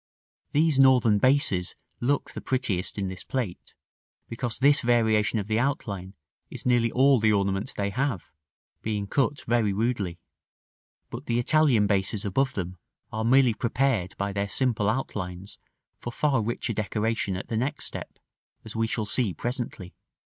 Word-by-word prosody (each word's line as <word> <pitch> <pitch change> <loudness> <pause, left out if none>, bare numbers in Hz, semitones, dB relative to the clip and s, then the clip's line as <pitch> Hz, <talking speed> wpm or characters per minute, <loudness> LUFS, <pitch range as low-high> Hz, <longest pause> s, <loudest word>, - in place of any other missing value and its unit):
These 150 -2 +3
Northern 125 -6 +5
bases 130 -8 +2 0.2
look 140 +4 0
the - - -7
prettiest 110 -9 -1
in 100 -1 -1
this 95 0 -7
plate, 120 -9 -4 0.5
because 115 0 -3
this 145 +2 +4
variation 110 -3 +2
of 105 - -2
the 110 +2 0
outline 100 -8 -2 0.3
is - - -7
nearly 120 -2 +3
all 135 0 +4
the 110 0 +3
ornament 100 -1 0
they 100 0 -1
have, 125 -4 -2 0.5
being 105 -2 -2
cut 140 +6 0
very 115 -3 +2
rudely; 105 -5 -1 0.9
but - - -7
the 120 - +1
Italian 125 -3 +4
bases 100 +1 0
above 130 +7 0
them 90 -2 -4 0.3
are 110 +1 -2
merely 125 0 +5
prepared 115 -4 0
by 100 0 -2
their 100 0 -1
simple 105 0 +1
outlines 100 -6 -4 0.4
for 120 - -5
far 135 -1 +1
richer 115 +1 -2
decoration 105 -1 -1
at 95 - -7
the 115 - -2
next 135 +6 -2
step, - - -6 0.5
as 110 - -7
we 115 0 +1
shall 110 -1 -2
see 105 -4 0
presently. 120 - -5
110 Hz, 155 wpm, -26 LUFS, 100-130 Hz, 0.9 s, Northern